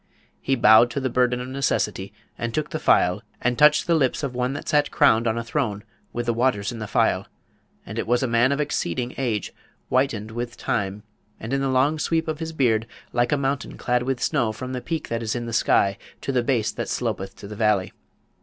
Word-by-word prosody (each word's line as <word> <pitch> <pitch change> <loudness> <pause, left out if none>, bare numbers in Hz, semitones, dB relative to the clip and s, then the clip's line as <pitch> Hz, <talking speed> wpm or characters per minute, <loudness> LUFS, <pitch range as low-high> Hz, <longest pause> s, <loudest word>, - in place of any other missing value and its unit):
He 135 - +1
bowed 115 0 +6
to 140 - -3
the 130 -2 -2
burden 125 0 +2
of 125 - -6
necessity, 135 +1 -1 0.2
and - - -4
took - - -2
the - - -2
phial, - - +3 0.2
and 125 0 +1
touched 150 +3 +5
the 170 - +2
lips 145 -3 +1
of 135 -3 -2
one 125 +1 -1
that 145 - -7
sat 145 -1 +2
crowned 115 +1 +4
on 110 +1 0
a 115 - -2
throne 115 -5 -2 0.3
with 120 0 -3
the 120 - +1
waters 120 -2 +1
in 115 - -7
the 110 - -5
phial; - - +1 0.6
and 110 +3 -5
it - - -3
was 120 +2 +2
a - - +1
man 120 +3 +3
of 140 - 0
exceeding 125 - -2
age, 115 -7 -2 0.4
whitened 115 -5 0
with 120 +1 -5
time, 100 0 -2 0.4
and 115 +4 -5
in 135 - +1
the 135 - 0
long 135 +4 +2
sweep 160 +1 0
of 155 -1 -3
his 160 0 -4
beard 115 -7 +1 0.3
like 120 0 +1
a 145 - +3
mountain 135 0 -2
clad 125 0 0
with 130 0 -2
snow 125 -7 +1
from 130 +4 -6
the 125 - -3
peak 165 +2 -3
that 115 0 -2
is 110 0 -2
in 120 -1 -3
the 115 - -5
sky 100 -3 +2 0.2
to - - -2
the 125 -2 +2
base 120 -3 0
that - - -5
slopeth 95 0 -3
to 100 - -10
the 105 - -8
valley. 105 -3 +1
125 Hz, 230 wpm, -24 LUFS, 115-135 Hz, 0.6 s, bowed